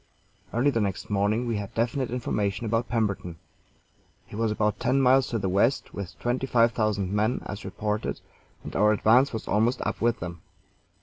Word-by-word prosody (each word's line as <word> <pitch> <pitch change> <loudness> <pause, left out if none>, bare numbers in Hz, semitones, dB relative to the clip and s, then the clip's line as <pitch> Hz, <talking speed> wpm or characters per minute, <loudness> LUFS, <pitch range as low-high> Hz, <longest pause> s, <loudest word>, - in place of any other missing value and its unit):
Early 125 +6 +2
the 115 - 0
next 100 0 -3
morning 105 +4 +1
we 115 -3 -1
had 100 -1 -6
definite 120 +3 0
information 105 -4 -2
about 115 +2 0
Pemberton. 100 -7 -1 0.9
He - - -11
was 110 0 0
about 105 -1 0
ten 130 +2 +2
miles 130 0 +4
to 115 - -2
the 100 -3 -2
west, 100 +8 +1
with 100 -3 -7
twenty 125 +2 -1
five 115 -2 +4
thousand 105 -4 -1
men, 110 +4 +1
as 105 - -6
reported, 105 +2 -3 0.4
and - - -8
our 105 +1 +4
advance 115 +6 +4
was 110 - -5
almost 115 +5 +2
up - - -3
with 115 0 +2
him. 85 0 -6
110 Hz, 180 wpm, -26 LUFS, 100-120 Hz, 0.9 s, miles